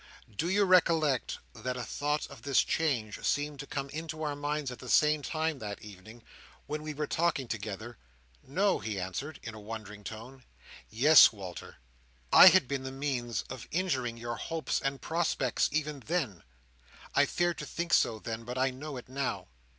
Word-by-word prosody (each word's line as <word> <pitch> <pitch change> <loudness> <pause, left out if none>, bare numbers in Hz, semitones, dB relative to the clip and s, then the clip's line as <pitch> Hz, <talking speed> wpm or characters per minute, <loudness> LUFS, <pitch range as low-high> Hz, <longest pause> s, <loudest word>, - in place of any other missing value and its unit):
Do 165 - -1
you 205 +2 +3
recollect 165 -8 +3 0.2
that 125 0 -4
a 125 - -3
thought 150 +4 -1
of 140 - -12
this 140 -2 +3
change 125 -10 -1
seemed 145 -1 0
to 140 - -6
come 140 -1 -3
into 155 +1 -5
our 145 -1 -1
minds 145 -1 -2
at 125 - -9
the 125 - -9
same 150 +2 +4
time 160 0 -2
that 105 -3 -6
evening, 110 +3 -12 0.4
when 150 0 -4
we 155 0 -5
were 150 +1 -2
talking 160 -4 0
together?" 110 +1 -5 0.4
"No!" 190 +8 +1
he 105 -3 -3
answered, 95 - -5
in 115 - -6
a 110 - -9
wondering 105 -1 -8
tone. 120 +5 -9 0.5
"Yes, 145 +8 +8
Walter. 95 -5 -9 0.6
I - - +11
had - - +7
been 140 0 -2
the 130 0 -5
means 130 -5 -2
of 130 -2 -9
injuring 130 -10 -1
your 120 0 -4
hopes 165 -1 -2
and 135 0 -2
prospects 160 -6 0
even 150 -1 -1
then. 135 - -2 0.7
I - - +4
feared 175 -1 0
to - - -5
think 170 0 -3
so, 110 - +4
then, 115 +1 -5
but 125 +2 -6
I 130 +1 +2
know 140 +2 -7
it 125 - -9
now. 135 - -3
135 Hz, 180 wpm, -30 LUFS, 115-155 Hz, 0.7 s, I